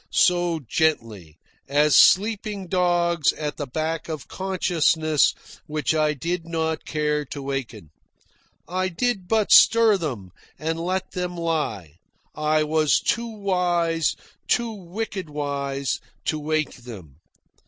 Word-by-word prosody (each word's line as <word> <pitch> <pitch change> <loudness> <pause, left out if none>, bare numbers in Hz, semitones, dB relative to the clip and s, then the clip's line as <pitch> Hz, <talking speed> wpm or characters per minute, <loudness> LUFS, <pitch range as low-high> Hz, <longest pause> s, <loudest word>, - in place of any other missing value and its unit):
so 175 -2 +2
gently, 110 - -1 0.3
as 145 +2 +3
sleeping 205 0 +4
dogs 175 -3 +2
at 150 -1 -5
the 145 - -4
back 160 +5 -3
of 155 -4 -5
consciousness 165 -5 +1 0.4
which 150 +1 -1
I 155 -1 +1
did 170 +4 -3
not 160 -1 -2
care 150 0 -1
to 140 - -7
waken. 125 - -5 0.8
I 185 +1 -1
did 195 +1 -2
but 220 0 +1
stir 230 -3 +7
them, 120 - -5 0.3
and 160 +1 -3
let 185 +3 -2
them 180 -1 -4
lie. 145 - -3 0.4
I 155 0 +1
was 155 -1 +2
too 235 0 -1
wise, 175 -6 0 0.3
too 235 -1 +1
wicked 195 -2 -6
wise, 140 -2 -3 0.3
to 155 - -1
wake 155 -1 -2
them. 100 - -11
160 Hz, 120 wpm, -23 LUFS, 145-180 Hz, 0.8 s, stir